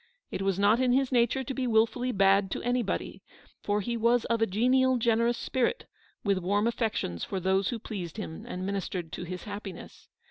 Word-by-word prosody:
It - - -3
was 195 -1 0
not 205 +4 +4
in 255 -1 +3
his 270 0 +2
nature 245 +2 +2
to 265 - -4
be 260 -1 -2
wilfully 235 +2 +2
bad 195 -1 +3
to - - -5
anybody; 245 -3 -1 0.4
for 205 0 0
he 235 +4 -2
was 235 +1 +2
of 230 -1 0
a 225 - +4
genial, 255 +6 +3
generous 235 0 +2
spirit, 260 - -1 0.4
with 200 -2 +2
warm 200 +4 +1
affections 220 - -1
for 190 - -3
those 190 +1 +1
who 240 - -2
pleased 195 -5 -6
him 210 -2 -6
and 185 -4 -4
minis 200 -1 -2
tered 175 -4 -5
to 180 - -5
his 180 0 -6
happiness. 200 -3 -8
220 Hz, 200 wpm, -28 LUFS, 195-240 Hz, 0.4 s, not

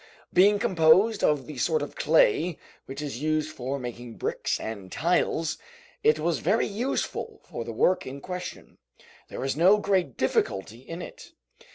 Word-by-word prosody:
Being 200 +3 +6
composed 195 +1 +4
of 145 -3 +2
the 155 - -8
sort 470 - +1
of - - -7
clay 455 - +3 0.3
which 135 +3 -6
is 135 -3 -5
used 155 0 0
for 130 +2 -3
making 120 -2 -7
bricks - - -2
and 100 -4 -6
tiles, 165 -1 0 0.4
it 450 +1 +4
was 170 -2 0
very 200 +7 +2
useful 260 - -3
for 115 - -6
the 115 - -6
work 155 +11 +2
in 135 +2 -6
question. 180 +4 -7 0.5
There - - -6
was 135 +1 -1
no 185 +7 +6
great 195 -3 0
difficulty 445 -3 -1
in - - -7
it. - - -11
170 Hz, 160 wpm, -27 LUFS, 140-210 Hz, 0.5 s, Being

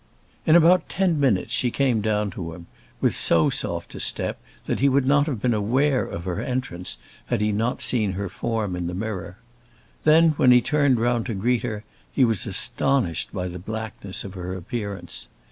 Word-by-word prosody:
In 160 - +6
about 175 +1 +5
ten 180 -5 +1
minutes 120 -10 +1
she 125 - +2
came 125 -3 +1
down 105 -1 0
to 85 -2 -6
him, 85 0 -12 0.4
with - - +2
so 80 -1 +4
soft - - -1
a - - -7
step - - 0 0.2
that - - -2
he 140 - +4
would 135 0 +2
not 145 +2 +3
have 130 -8 -2
been 120 +2 +1
aware 130 +6 +1
of 85 - -6
her 90 -2 -3
entrance 90 - -2 0.3
had - - 0
he 105 0 +1
not 110 +4 0
seen 110 -6 +2
her 100 +1 -3
form 105 0 -3
in 90 -1 -3
the 90 - -4
mirror. 95 -2 -5 0.7
Then, 160 +2 +6
when 130 - +4
he 125 0 +8
turned 140 -1 +2
round 120 0 0
to 115 - -3
greet 120 +5 +1
her, 105 -3 -4 0.3
he 130 - +3
was 110 -5 -1
astonished 125 - 0
by 90 -2 -3
the 90 0 -7
blackness 110 -1 -5
of 100 - -8
her 90 -1 -5
appearance. 100 +1 -6
110 Hz, 195 wpm, -24 LUFS, 95-130 Hz, 0.7 s, he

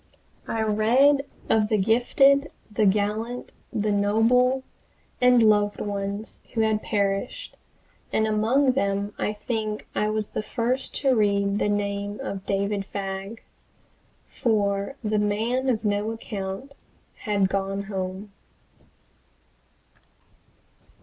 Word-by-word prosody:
I 225 -1 -1
read 255 +7 +3 0.2
of 215 -1 +3
the 215 - +3
gifted, 270 +7 +4 0.2
the 210 0 +2
gallant, 215 +5 -1 0.2
the 215 -2 0
noble, 230 +6 +3 0.6
and 250 -1 +6
loved 205 -1 +3
ones 200 +1 -4 0.2
who 225 - +2
had 220 -1 +1
perished, 200 - -2 0.6
and 220 - +2
among 225 +6 +3
them 200 -4 -1
I 210 - 0
think 215 0 -3
I 210 - 0
was 215 -1 -2
the - - -3
first 245 +4 -2
to 270 -3 +3
read 200 -1 +2
the - - +1
name 205 0 -2
of 195 -1 -5
David 200 0 0
Fagg. 195 +2 -6 0.8
For 200 +1 0
the 215 -1 +1
"man 225 +6 0
of 225 -3 0
no 205 +1 0
account" 215 +3 -5 0.4
had 205 -4 +1
"gone 195 +1 -2
home!" 190 0 -5
210 Hz, 115 wpm, -25 LUFS, 200-230 Hz, 0.8 s, and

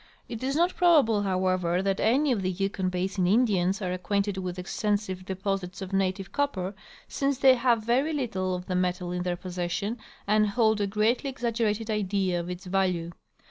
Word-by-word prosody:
It 230 - -6
is 270 +2 -1
not 345 +3 +2
probable, 290 - +4
however, 185 -2 0
that 195 -1 +1
an}^ 265 +5 +3
of 210 - -1
the 185 - 0
Yukon 190 0 -1
basin 185 0 -1
Indians 200 -3 +2
are 180 -1 -1
acquainted 200 +2 -1
with 185 -1 -4
exten 205 +3 0
sive 185 -3 -7
deposits 190 -1 -3
of 190 0 -7
native 195 0 -1
copper, 200 -10 -1 0.3
since 275 -1 -1
they 265 0 +6
have 240 -3 +2
very 255 +7 +1
little 215 -11 -1
of 180 0 -6
the 185 - -3
metal 180 0 -1
in 180 0 -2
their 180 -1 -2
possession 185 +5 -3 0.3
and 215 +1 +3
hold 220 -1 +2
a 200 - +1
greatly 220 +7 +1
exaggerated 230 -4 -1
idea 195 -3 0
of 170 +1 -5
its 180 +2 -6
value. 180 -3 0
195 Hz, 180 wpm, -27 LUFS, 185-225 Hz, 0.3 s, they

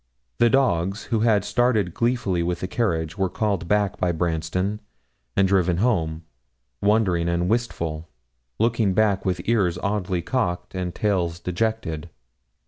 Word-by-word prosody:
The 120 - +5
dogs, 105 -7 +1
who 110 - +3
had 105 -3 +3
started 115 -8 +1
gleefully 115 -7 0
with 85 0 -2
the 90 - -2
carriage, 85 -5 -1
were 95 -1 +1
called 100 -4 -1
back 105 0 +1
by 90 - +2
Branston, 85 +5 -1 0.5
and 95 0 +4
driven 90 -3 +2
home, 85 -7 0 0.6
wondering 95 -5 +2
and 85 +1 0
wistful, 85 -8 -2 0.5
looking 110 -4 +1
back 105 -3 +2
with 90 -1 -2
ears 100 -7 +2
oddly 95 -4 -1
cocked 115 -10 -2
and 90 -2 -3
tails 90 -5 0
dejected. 90 -3 -2
95 Hz, 135 wpm, -24 LUFS, 85-110 Hz, 0.6 s, The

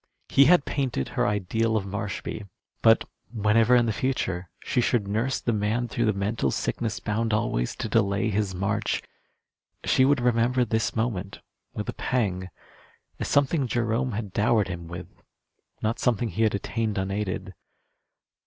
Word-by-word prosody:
He 140 - +6
had 175 -2 +5
painted 130 - -1
her - - 0
ideal 110 +3 0
of 100 - -2
Marshby; 100 +1 -4 0.3
but - - +6 0.3
whenever 110 +2 +4
in 120 -1 +5
the 110 - 0
future 95 -9 -2
she 125 - +1
should 115 -4 +1
nurse 115 +6 0
the 120 - -1
man 110 +3 0
through 120 +1 -1
the 110 - +3
mental 100 -5 0
sickness 115 - -2
bound 110 +1 0
always 60 - -1
to - - -3
delay 105 -1 +1
his 100 -2 -1
march, 110 +4 -1 0.8
she 130 - +4
would 140 +1 +4
remember 120 +1 +2
this 110 0 0
moment 110 -4 -2 0.3
with - - -4
a - - -2
pang, 95 -7 -1 0.7
as - - -2
something 140 0 +2
Jerome 120 +1 0
had 105 -2 -4
dowered 105 -1 +2
him 85 -2 -6
with, 85 +1 -9 0.6
not 110 +2 0
something 120 -1 +1
he 110 - -3
had 110 -2 +3
attained 105 +1 -2
unaided. 95 0 -2
110 Hz, 155 wpm, -26 LUFS, 100-120 Hz, 0.8 s, He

